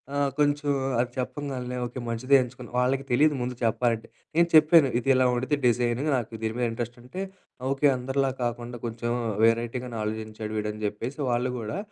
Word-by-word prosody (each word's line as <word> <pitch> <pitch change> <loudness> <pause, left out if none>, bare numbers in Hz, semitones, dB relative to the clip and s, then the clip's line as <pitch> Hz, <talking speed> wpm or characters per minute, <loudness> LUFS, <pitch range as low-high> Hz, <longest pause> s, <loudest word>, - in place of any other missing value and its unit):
ఆహ్, 145 -1 +2
కొంచెం 145 0 +2 0.3
అది 120 0 0
చెప్పంగాల్నె, 125 -1 -4
"ఓకే! 125 +1 -6
మంచిదే 130 +4 +2
ఎంచుకు" 125 0 -10 0.2
వాళ్ళకి 135 +2 +1
తెలీదు 150 +4 +4
ముందు 125 +1 -3
చెప్పాలంటే. 115 0 +1 0.3
నేను 170 +1 +5
చెప్పాను 155 -2 +7
ఇది 130 - -2
ఇలా 130 0 +3
ఉండిది 130 +4 0
డిజైనింగ్ 120 +4 +1
నాకు 115 -3 -4
దీని 110 0 -1
మీద 125 - +1
ఇంట్రెస్ట్ 120 +1 -5
అంటే. 180 +10 -6 0.5
ఓకే. 135 +2 +1
అందరిలా 135 +2 0
కాకుండా 120 0 -3
కొంచెం 120 +1 -3 0.3
వెరైటీగానే 115 +1 +1
ఆలోచించాడు 110 0 -4
వీడు 105 0 -1
అని 105 0 -9
జెప్పేసి 115 +7 -4
వాళ్ళు 125 +1 +1
గూడా, 110 - -4
125 Hz, 165 wpm, -26 LUFS, 115-135 Hz, 0.5 s, చెప్పాను